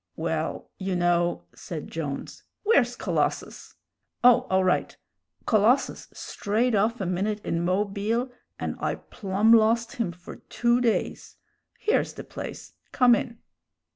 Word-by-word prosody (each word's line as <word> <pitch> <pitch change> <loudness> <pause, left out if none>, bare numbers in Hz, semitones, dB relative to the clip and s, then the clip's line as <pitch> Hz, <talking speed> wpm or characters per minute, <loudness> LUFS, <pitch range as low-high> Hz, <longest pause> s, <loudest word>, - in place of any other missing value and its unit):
"Well, - - -3
you 190 -1 -2
know," 175 0 +1
said 160 -4 -7
Jones 145 -4 -5 0.2
"where's 250 - +3
Colossus? - - -2 0.5
Oh! 250 +1 +6
all 190 0 +3
right. 185 -1 0 0.5
Colossus 225 +5 +2
strayed 225 +4 -1
off 220 +4 +1
a 195 - -2
minute 195 +4 -1
in 170 0 -1
Mobile, 205 +6 0 0.3
and - - -4
I - - -1
plum 205 +3 +1
lost 230 +1 +3
him 225 -7 -1
for 175 +1 -11
two 240 +1 0
days. 235 -3 -1 0.4
Here's 435 - 0
the - - -8
place; - - -8 0.2
come 250 -2 +5
in. 235 0 -1
215 Hz, 130 wpm, -26 LUFS, 185-240 Hz, 0.5 s, Oh